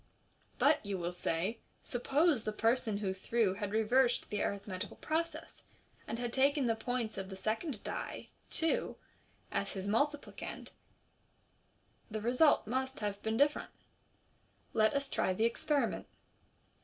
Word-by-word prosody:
But, 295 +1 +4
you 200 -2 -2
will 175 0 -2
say, 180 +5 -1 0.2
suppose 275 +2 +2
the 215 - -1
person 225 0 +1
who 195 -2 -1
threw 200 +1 +1
had 205 0 -4
reversed 240 +3 +3
the 205 - 0
arithmetical 200 0 -3
process, 330 +1 -3 0.5
and 225 - -3
had 240 0 -3
taken 280 +1 +3
the 230 -1 +2
points 225 -2 -2
of 190 0 -5
the 190 - -6
second 215 - -2
die - - -5 0.2
(two) 325 -1 0 0.6
as 200 - -1
his 195 0 -4
multiplicand, 285 +7 -1 1.4
the 215 0 -3
result 250 +5 +4
must 260 +4 -2
have 205 -1 -2
been 220 0 -1
different. 290 +3 +3 1.0
Let 215 -1 +4
as 280 0 0
try 190 - +1
the 220 +5 +2
experiment. 280 +5 0
225 Hz, 135 wpm, -34 LUFS, 205-265 Hz, 1.4 s, But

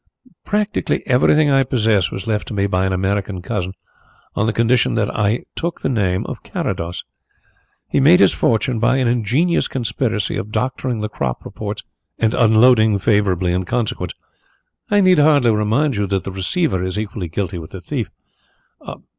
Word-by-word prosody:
"Practically 210 0 -1
everything 145 +3 +3
I 135 0 +4
possess 110 -8 +1
was 95 - -6
left 110 -2 -2
to 110 - -6
me 100 0 +1
by 95 -1 0
an - - -1
American 95 +1 -1
cousin, 95 -3 -3 0.6
on 110 - +1
the - - +2
condition 115 +2 +2
that 105 -3 -1
I 105 +3 0
took 170 0 -4
the - - -1
name 95 -7 0
of - - -7
Carrados. 85 +1 -4 0.8
He - - 0
made 160 +7 +6
his - - +5
fortune 115 +1 0
by 125 +3 +2
an 130 -2 +1
ingenious 125 +9 +1
conspiracy 115 -3 -2
of 105 - -5
doctoring 125 -1 -2
the 105 - -2
crop 65 - -4
reports - - -6 0.3
and 110 -1 +1
unloading 110 -1 +4
favourably 95 -3 +1
in 90 +1 0
consequence. 100 -4 -2 0.8
And 205 - +2
I - - +5
need 185 -3 +5
hardly 145 -5 +4
remind 110 +7 +1
you 100 -1 0
that 95 -1 -1
the 95 - -5
receiver 95 - -1
is 95 +1 -3
equally 105 -3 -4
guilty 90 +1 -3
with 80 - -10
the 95 - -8
thief." - - -4
110 Hz, 170 wpm, -19 LUFS, 95-125 Hz, 0.8 s, made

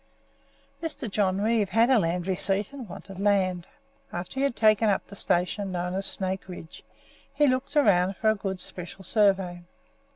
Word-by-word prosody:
Mr. 320 -6 -4
John 195 -2 0
Reeve 215 -2 +2
had 230 +5 +3
a 255 - +6
land 170 -1 -1
receipt, 195 +4 -1
and 255 -7 -8
wanted 190 +1 -9
land. 190 -3 +1 0.4
After 175 +9 -5
he - - +1
had 280 -4 +1
taken 215 0 +4
up 200 - 0
the 200 - -12
station 185 +2 0
known 180 0 -2
as 195 +1 -2
Snake 190 0 -3
Ridge 175 -3 -10 0.5
he 290 +2 +3
looked 260 +2 0
about 195 -9 +4
for 220 -1 +3
a - - 0
good 195 -2 -4
Special 180 +2 -6
Survey. 190 -3 +2
195 Hz, 170 wpm, -27 LUFS, 185-220 Hz, 0.5 s, a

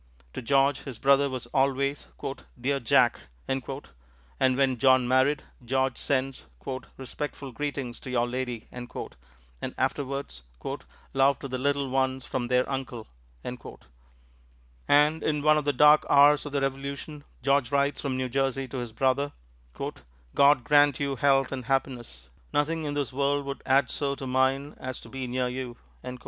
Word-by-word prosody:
To - - -5
George 135 +2 +2
this 135 -5 -7
brother 140 +2 +4
was 130 -2 -4
always, 140 +1 +1 0.5
"Dear 140 +3 0
Jack," 115 - +3 0.3
and 135 -1 -2 0.9
when 135 -2 +2
John 130 -1 +5
married, 130 +3 +3 0.2
George 130 +1 0
sends 135 - -1 0.5
"respectful 135 +1 -6
greetings 135 -2 -4
to - - -9
your 120 -1 +1
Lady," 125 -2 -4
and 125 - -7 0.9
afterwards 140 - -2 0.7
"love 135 +1 +4
to 140 - -7
the 130 -1 -4
little 140 +1 0
ones 130 0 0
from 125 -2 -2
their 125 +1 +2
Uncle." 130 -4 -4 0.4
And - - -3
in 150 -2 0
one 155 0 +5
of 150 - -6
the 145 - +3
dark 150 +3 +6
hours 145 +1 +6
of - - -7
the 140 -1 0
Revolution, 140 +2 -4 0.2
George 140 -2 +2
writes 140 0 +1
from 135 -2 -2
New 130 0 -1
Jersey 135 +1 -1
to 130 - -5
this 120 -2 -5
brother: 135 +4 +1 1.0
"God 140 -2 +5
grant 145 +1 +4
you 140 -2 -1
health 135 -1 +3
and 130 -3 -4
happiness. 120 - -2 0.2
Nothing 155 +2 0
in 145 -1 -3
this 140 -4 -2
world 140 +1 +1
would 140 0 -5
add 135 +1 +3
so 140 -1 -1
to 135 - -7
mine 130 +2 +1
as 130 0 -5
to - - -12
be 130 -1 -5
near 125 +1 -1
you." 125 -1 -5
135 Hz, 155 wpm, -27 LUFS, 125-140 Hz, 1.0 s, dark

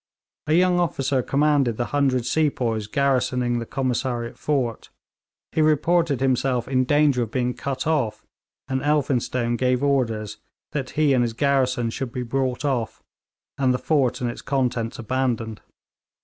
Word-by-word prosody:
A 155 - +2
young 180 0 +4
officer 135 -6 0
commanded 140 -3 +2
the 120 - -1
hundred 135 -4 +2
sepoys 125 -7 0
garrisoning 125 -1 +1
the 115 - -6
Commissariat 125 -2 -2
fort; 130 -6 -2 0.6
he 160 - +1
reported 155 -1 +2
himself 130 -2 +1
in 130 -1 +1
danger 145 -2 +3
of 115 - -2
being 125 +1 -1
cut 135 0 -4
off, 125 -9 -1 0.4
and 130 0 -1
Elphinstone 130 -5 0
gave 125 +1 +1
orders 115 -7 0 0.3
that 140 -3 -3
he 150 -3 +4
and 125 - +3
his 115 -1 -2
garrison 130 -2 +1
should 130 +1 -4
be 125 +1 -3
brought 130 +2 -1
off, 125 -6 -2 0.6
and 130 -2 +3
the - - +1
fort 135 -4 +1
and 120 -1 0
its - - -9
contents 125 -4 -1
abandoned. 120 -2 -2
130 Hz, 150 wpm, -23 LUFS, 120-140 Hz, 0.6 s, young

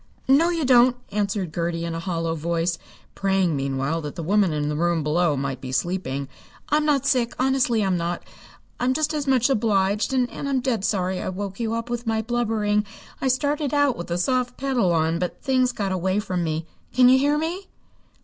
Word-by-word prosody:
"No 290 +6 +5
you 335 -4 -1
don't!" 250 -1 +5 0.2
answered 200 -4 -1
Gertie 170 0 -2
in 170 - -3
a 165 - -3
hollow 165 -2 -2
voice, 165 +1 -1 0.3
praying 190 -4 +1
meanwhile 135 +3 -1
that 150 -2 -6
the 170 - -5
woman 195 +1 +2
in 150 -1 -1
the 150 - -1
room 170 0 +1
below 150 0 +1
might 135 -1 -3
be 130 - -6
sleeping. 140 -3 -2 0.4
"I'm 300 0 +2
not 280 -3 +2
sick, 250 -4 +1
honestly 255 -4 +2
I'm 185 -2 +1
not. 170 +1 -3 0.6
I'm 255 +1 +1
just 310 +1 0
as 295 -2 -2
much 255 -3 +3
obliged, 210 -5 +1
and 255 -2 +2
I'm 275 -2 -1
dead 245 -6 -1
sorry 185 -3 0
I - - -3
woke 195 +2 -5
you 230 -1 -1
up 230 0 -3
with 240 0 -3
my 220 0 0
blubbering. 220 -3 0 0.4
I 270 - +1
started 285 +3 0
out 285 -3 +3
with 170 - -6
the 170 - -2
soft 250 +5 0
pedal 260 -9 +1
on, 165 0 +1
but 180 0 -3
things 255 -2 +2
got 200 -5 -3
away 185 +1 0
from 185 -4 -2
me. 160 0 -2 0.3
Can 250 0 +5
you 260 +1 +6
hear 290 +2 +2
me?" 345 +5 -3
205 Hz, 200 wpm, -23 LUFS, 170-255 Hz, 0.6 s, you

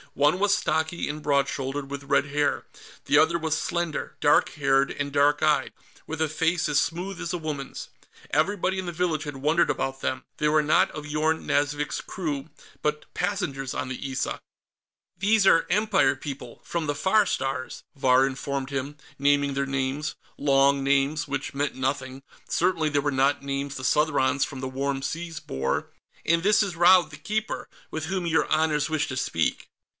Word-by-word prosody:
One 150 +5 +3
was 200 0 +3
stocky 160 +1 0
and 150 +1 -4
broad 140 -1 +2
shouldered, 135 +1 -4
with 140 0 -5
red 140 - +2
hair; 145 0 0 0.4
the 145 - +4
other 160 +2 +4
was 160 -2 -1
slender, 170 -3 -3
dark 145 - +4
haired 135 -1 +2
and 145 0 -3
dark 145 +1 +3
eyed, 150 -1 +2 0.3
with 160 0 -5
a 160 - +3
face 165 +3 0
as 150 -1 +3
smooth 180 +3 -3
as 170 - -3
a 180 - -1
woman's. 150 -4 -5 0.4
Everybody 190 +5 +1
in 185 - -4
the - - -2
village 165 -2 -1
had 145 -3 -6
wondered 155 +5 +2
about 135 0 -2
them. 130 0 -2
They 150 - +1
were 155 0 +3
not 150 - +3
of 150 -1 -7
Yorn 155 +2 0
Nazvik's 145 +1 0
crew, 155 -5 -4 0.3
but 150 0 -1
passengers 135 -10 -2
on - - -2
the 130 +1 -5
Issa. 130 0 -2 0.8
"These 205 +1 +3
are 165 - +5
Empire 195 -10 +3
people, 135 -3 -7
from 170 -3 -2
the 145 - 0
Far 205 +7 +3
Stars," 135 -1 -3
Vahr 130 -1 +4
informed 135 0 -4
him, 140 +2 -3 0.2
naming 140 0 +3
their 140 0 -1
names. 135 +2 -2 0.2
Long 140 -1 +3
names, 140 +2 +2
which 135 - -3
meant 145 +1 -1
nothing; 130 0 -3 0.3
certainly 170 -3 +1
they 145 -1 +1
were 145 0 0
not 140 +1 +2
names 140 0 -3
the 130 - -6
Southrons 140 -2 +2
from 135 - -8
the 130 - -3
Warm 135 +1 -2
Seas 165 +2 -4
bore. 65 - -2 0.3
"And 165 +1 +2
this 210 +2 +4
is 195 -3 -4
Raud 175 +1 +6
the 145 - -9
Keeper, 215 +8 -3 0.2
with 155 0 -3
whom 185 +1 -2
your 160 -1 +2
honors 155 -1 +1
wish 155 -2 0
to 130 - -4
speak." 80 -10 -1
145 Hz, 180 wpm, -26 LUFS, 135-160 Hz, 0.8 s, Raud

